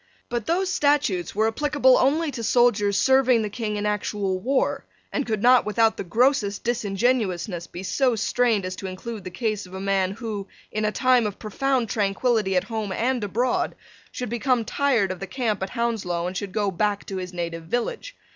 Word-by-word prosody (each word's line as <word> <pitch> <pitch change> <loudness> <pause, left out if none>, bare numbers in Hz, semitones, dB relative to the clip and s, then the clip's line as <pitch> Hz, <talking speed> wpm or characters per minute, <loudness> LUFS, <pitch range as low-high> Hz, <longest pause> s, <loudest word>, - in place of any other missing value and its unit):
But 240 -3 -3
those 370 +2 +1
statutes 285 - +1
were 220 +1 +3
applicable 260 +2 +3
only 300 +4 +2
to 240 -3 -6
soldiers 210 -4 +3
serving 260 -2 +4
the 210 - -4
King 215 -2 -3
in 205 0 -2
actual 205 -2 -1
war, 260 +6 0 0.3
and 285 - -1
could 215 -2 -1
not 250 0 +6
without 220 +1 +2
the - - -4
grossest 215 +1 +1
disingenuousness 205 -5 0
be 180 - -8
so 250 +4 +1
strained 225 -2 +1
as 185 0 -4
to 195 - -5
include 200 +3 -6
the - - -4
case 210 +1 -2
of 185 - -11
a - - -5
man 195 -1 0
who, 210 -3 -5 0.2
in 215 0 -1
a 210 - +1
time 250 0 +3
of 205 - -6
profound 255 +3 -1
tranquillity 205 0 +1
at 180 - +3
home 215 0 -4
and 245 +3 0
abroad, 240 +5 0 0.4
should 250 - -5
become 240 0 +1
tired 240 -6 +1
of 185 - -6
the 195 - -5
camp 225 -6 -2
at 190 - -2
Hounslow 220 -8 -1
and 180 +1 -4
should 195 +1 -4
go 205 0 0
back 205 +2 -1
to 195 - -5
his 180 -1 -5
native 170 -2 -5
village. 440 - -3
215 Hz, 195 wpm, -24 LUFS, 195-250 Hz, 0.4 s, not